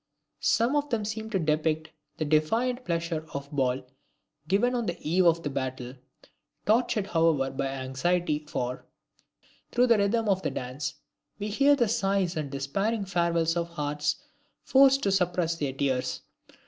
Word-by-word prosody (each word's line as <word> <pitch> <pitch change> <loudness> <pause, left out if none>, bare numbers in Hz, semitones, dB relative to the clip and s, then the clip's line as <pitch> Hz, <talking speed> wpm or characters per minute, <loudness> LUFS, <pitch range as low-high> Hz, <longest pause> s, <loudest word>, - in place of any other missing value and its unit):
Some 235 +5 +2
of 290 0 0
them 220 -4 -1
seem 220 +1 -4
to 210 - 0
depict 155 -1 0 0.3
the 155 - -1
defiant 225 - +1
pleasure 165 -2 -2
of 140 0 -4
the 150 - -9
ball 130 -1 +1 0.6
given 210 +8 +2
on 240 -3 -1
the 175 - -2
eve 175 +3 +4
of 165 0 +3
battle, 130 -2 -4 0.7
tortured 220 -2 +2
however 165 -7 +2
by 135 0 -2
anxiety 140 +5 -1
for, 125 -3 -3 0.9
through 245 +1 +4
the 230 -3 +4
rhythm 220 +3 +1
of 190 -2 +2
the - - -1
dance, 130 +4 -4 0.4
we 205 +1 -4
hear 280 +7 +4
the 240 -5 +2
sighs 195 -5 0
and 150 -3 -3
despairing 195 +11 -1
farewells 170 -3 +1
of 170 0 -1
hearts 150 -2 -1 0.5
forced 275 0 +5
to 195 - +2
suppress 180 -3 +1
their 145 -4 -1
tears. 130 -2 -1
170 Hz, 155 wpm, -28 LUFS, 150-215 Hz, 0.9 s, forced